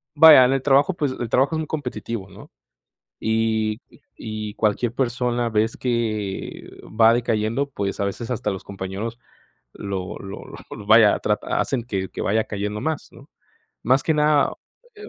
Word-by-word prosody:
vaya, 150 Hz, -4 st, +9 dB
en 130 Hz, -, +2 dB
el 135 Hz, -, 0 dB
trabajo, 140 Hz, +7 st, +3 dB
pues, 145 Hz, -5 st, -1 dB
el 120 Hz, -, -2 dB
trabajo 135 Hz, +7 st, +2 dB
es -, -, -1 dB
muy 155 Hz, -, -4 dB
competitivo, 115 Hz, -8 st, -5 dB
¿no? -, -, -14 dB, 0.7 s
Y 110 Hz, 0 st, 0 dB, 0.3 s
y 110 Hz, -1 st, -6 dB
cualquier 110 Hz, +2 st, 0 dB
persona 120 Hz, -2 st, -1 dB
vez 110 Hz, +1 st, 0 dB
que 110 Hz, -5 st, -3 dB
va 110 Hz, +1 st, +4 dB
decayendo, 115 Hz, +3 st, 0 dB
pues, 100 Hz, -7 st, -4 dB
a 100 Hz, -, +1 dB
veces, 115 Hz, +4 st, -4 dB
hasta 105 Hz, -3 st, -1 dB
los 95 Hz, -, -6 dB
compañeros 100 Hz, +4 st, -6 dB, 0.6 s
lo 95 Hz, -2 st, -5 dB
lo 95 Hz, 0 st, -8 dB, 0.3 s
lo, -, -, -8 dB
vaya, -, -, +6 dB
trata -, -, -1 dB
hacen 125 Hz, -3 st, -1 dB
que 95 Hz, -5 st, -3 dB
que -, -, -6 dB
vaya 110 Hz, +2 st, +1 dB
cayendo 105 Hz, +1 st, -4 dB
más, 160 Hz, -2 st, -3 dB
¿no? -, -, -16 dB, 0.5 s
Más 130 Hz, +3 st, +3 dB
que 160 Hz, -, +1 dB
nada, 150 Hz, -1 st, +3 dB, 0.4 s
eh 420 Hz, 0 st, -11 dB
115 Hz, 165 wpm, -22 LUFS, 105-130 Hz, 0.7 s, vaya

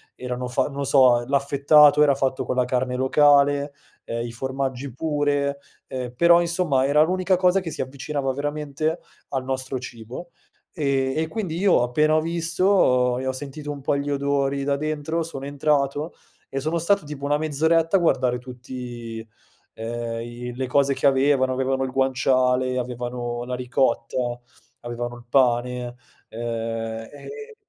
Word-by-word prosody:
erano 125 Hz, 0 st, -4 dB
fa 125 Hz, +1 st, 0 dB
non 140 Hz, -1 st, -4 dB
so, 125 Hz, -3 st, +5 dB
l'affettato 140 Hz, +2 st, +5 dB
era 145 Hz, -2 st, +5 dB
fatto 130 Hz, -1 st, -1 dB
con 125 Hz, -, -2 dB
la 125 Hz, -, +2 dB
carne 125 Hz, 0 st, -1 dB
locale, 145 Hz, +1 st, +3 dB, 0.3 s
ehm, 115 Hz, 0 st, -3 dB
i -, -, -7 dB
formaggi 130 Hz, +1 st, -4 dB
pure, 145 Hz, -1 st, 0 dB, 0.3 s
ehm, 125 Hz, -2 st, -5 dB
però, 170 Hz, +2 st, +6 dB
insomma, 170 Hz, -6 st, +1 dB
era 150 Hz, +2 st, +4 dB
l'unica 185 Hz, +2 st, +1 dB
cosa 185 Hz, +1 st, +3 dB
che 170 Hz, -3 st, -5 dB
si -, -, -4 dB
avvicinava 135 Hz, +1 st, -3 dB
veramente 150 Hz, +3 st, -2 dB, 0.3 s
al 135 Hz, -1 st, -2 dB
nostro 130 Hz, 0 st, -2 dB
cibo, 120 Hz, +7 st, -9 dB, 0.4 s
ehm, 135 Hz, -4 st, 0 dB
e 160 Hz, 0 st, 0 dB
quindi 185 Hz, -4 st, -4 dB
io 190 Hz, -5 st, +4 dB
appena 150 Hz, +6 st, +2 dB
ho 155 Hz, -, +3 dB
visto 165 Hz, -6 st, +2 dB
e 130 Hz, -, -4 dB
ho -, -, +1 dB
sentito 145 Hz, +2 st, -6 dB
un 145 Hz, -1 st, -7 dB
po' 140 Hz, +1 st, 0 dB
gli 145 Hz, +1 st, -2 dB
odori 140 Hz, 0 st, 0 dB
da 140 Hz, 0 st, 0 dB
dentro, 155 Hz, +2 st, -2 dB
sono 135 Hz, -4 st, -6 dB
entrato 145 Hz, +2 st, 0 dB, 0.4 s
e 135 Hz, -, -3 dB
sono 155 Hz, +5 st, -1 dB
stato 200 Hz, +2 st, +1 dB
tipo 145 Hz, -1 st, -7 dB
una 145 Hz, +1 st, +2 dB
mezz'oretta 160 Hz, +4 st, +2 dB
a -, -, +1 dB
guardare 130 Hz, -7 st, +2 dB
tutti, 120 Hz, -3 st, -8 dB, 0.5 s
ehm, 115 Hz, 0 st, -4 dB
i 120 Hz, +1 st, -7 dB
le 130 Hz, +1 st, -3 dB
cose 140 Hz, +2 st, +2 dB
che 135 Hz, -, +1 dB
avevano; 135 Hz, -1 st, +3 dB
avevano 130 Hz, +1 st, -1 dB
il -, -, -4 dB
guanciale, 130 Hz, -1 st, +1 dB
avevano 120 Hz, -1 st, -4 dB
la 125 Hz, 0 st, -3 dB
ricotta, 125 Hz, -1 st, -1 dB, 0.4 s
avevano 120 Hz, 0 st, -5 dB
il 120 Hz, -, -15 dB
pane, 125 Hz, -1 st, +1 dB, 0.3 s
ehm, 115 Hz, -1 st, -4 dB
e 440 Hz, -, -10 dB
135 Hz, 155 wpm, -23 LUFS, 125-150 Hz, 0.5 s, però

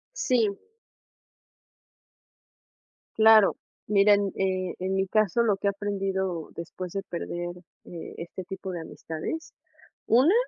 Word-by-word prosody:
Sí. 235 Hz, -, +1 dB, 2.6 s
Claro, 220 Hz, -2 st, +7 dB, 0.3 s
miren, 200 Hz, -1 st, +4 dB
eh, 185 Hz, -1 st, -1 dB
en 185 Hz, +1 st, -2 dB
mi 190 Hz, 0 st, +1 dB
caso 215 Hz, +2 st, +2 dB
lo 220 Hz, -4 st, +3 dB
que 200 Hz, -, -2 dB
he -, -, +5 dB
aprendido 195 Hz, -4 st, -2 dB
después 175 Hz, +2 st, -7 dB
de 195 Hz, -, -2 dB
perder 175 Hz, -1 st, -5 dB, 0.6 s
este 170 Hz, +2 st, -7 dB
tipo 190 Hz, +1 st, -6 dB
de 175 Hz, -2 st, -4 dB
amistades, 160 Hz, -, -6 dB, 0.5 s
una, 260 Hz, -, +5 dB
195 Hz, 110 wpm, -27 LUFS, 185-210 Hz, 2.6 s, Claro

